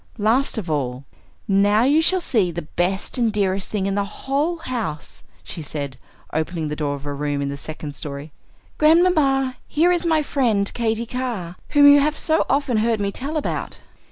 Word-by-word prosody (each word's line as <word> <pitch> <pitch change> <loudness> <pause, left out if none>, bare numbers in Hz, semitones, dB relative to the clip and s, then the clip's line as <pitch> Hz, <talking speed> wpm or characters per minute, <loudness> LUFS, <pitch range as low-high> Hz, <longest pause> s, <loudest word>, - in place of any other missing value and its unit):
Last 230 +5 +1
of 205 -5 -4
all, 135 -4 -2 0.4
"Now 205 +3 +3
you 290 +5 +4
shall 370 +3 +2
see 215 - +1
the 170 0 -5
best 185 +9 -1
and 230 -2 +2
dearest 195 -2 0
thing 205 -3 -2
in 195 - 0
the 200 0 0 0.2
whole 290 +6 0
house," 235 - -5 0.2
she 170 - -6
said, 140 -3 -5 0.4
opening 160 0 -2
the 150 - -3
door 145 -2 -2
of 140 0 -10
a 145 - -3
room 145 0 -2
in 140 0 -2
the 140 - -4
second 150 0 -7
story. 145 +1 -7 0.5
"Grandmamma, 305 -5 +3
here 335 +4 +3
is 350 -1 +1
my 320 -3 +2
friend 225 -9 +1
Katy 230 -1 -1
Carr, 235 -8 -4
whom 290 -1 +6
you 285 0 +8
have 300 +2 +1
so 320 0 +3
often 275 -3 +1
heard 225 0 +1
me 200 -1 -1
tell 285 +8 -4
about." 305 - -3
215 Hz, 185 wpm, -22 LUFS, -, 0.5 s, you